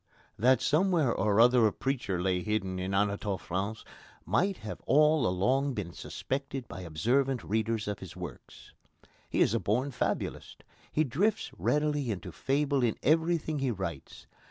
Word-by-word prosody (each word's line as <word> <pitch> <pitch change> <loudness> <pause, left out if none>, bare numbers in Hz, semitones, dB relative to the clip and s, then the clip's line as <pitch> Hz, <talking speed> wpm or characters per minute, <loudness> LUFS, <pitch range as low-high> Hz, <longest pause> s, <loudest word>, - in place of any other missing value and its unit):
That 125 +3 +4
somewhere 160 -5 +3
or 105 +1 +1
other 120 -1 +6
a - - 0
preacher 120 -10 -2
lay 90 0 0
hidden 95 -3 -2
in 95 +1 -3
Anatole 100 0 0
France 100 +6 -4 0.4
might 195 +1 +1
have 105 - -6
all 150 -2 +4
along 130 +9 +1
been 90 -5 -4
suspected 135 -2 -4
by 95 - -8
observant 120 - 0
readers 110 0 -1
of 105 -1 -3
his 95 -3 -9
works. 90 -8 -10 0.6
He - - 0
is - - +4
a - - +2
born 125 +7 0
fabulist. 125 - -3 0.3
He 155 - +2
drifts 190 - 0
readily 150 -3 0
into 95 -3 -4
fable 140 - 0
in 120 -3 +1
everything 160 0 +2
he 135 -1 0
writes. 95 - -5
120 Hz, 155 wpm, -30 LUFS, 95-140 Hz, 0.6 s, other